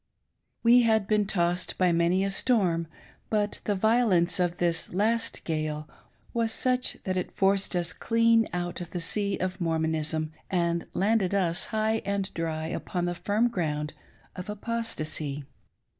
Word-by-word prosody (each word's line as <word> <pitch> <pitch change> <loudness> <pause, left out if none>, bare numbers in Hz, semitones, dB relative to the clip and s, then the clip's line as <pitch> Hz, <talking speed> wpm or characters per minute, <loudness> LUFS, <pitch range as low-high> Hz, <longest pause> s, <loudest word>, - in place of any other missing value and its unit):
We 240 +1 +7
had 220 -3 +3
been 210 0 +1
tossed 175 -1 0
by 180 -1 +3
many 170 +3 +2
a 195 - 0
storm, 185 -7 +1 0.4
but 210 -1 0
the 205 - +1
violence 205 -5 +3
of 175 -1 0
this 170 -1 0
last 225 +5 0
gale 155 -1 -2 0.5
was 230 -1 +1
such 255 +2 0
that 185 -1 -1
it 180 - -3
forced 195 -1 +2
us 175 0 +1
clean 230 -1 +3
out 175 0 -3
of 175 - -6
the 175 - -4
sea 200 +3 0
of 185 0 -3
Mormonism, 160 -1 0 0.2
and 170 -2 0
landed 200 -1 +2
us 175 -4 +1
high 220 0 0
and 200 -1 -2
dry 160 -1 -2
upon 175 +2 -3
the 175 - -1
firm 210 +6 +1
ground 155 -8 -2 0.4
of 180 +2 -7
apostacy. 160 - -3
185 Hz, 150 wpm, -27 LUFS, 170-215 Hz, 0.5 s, We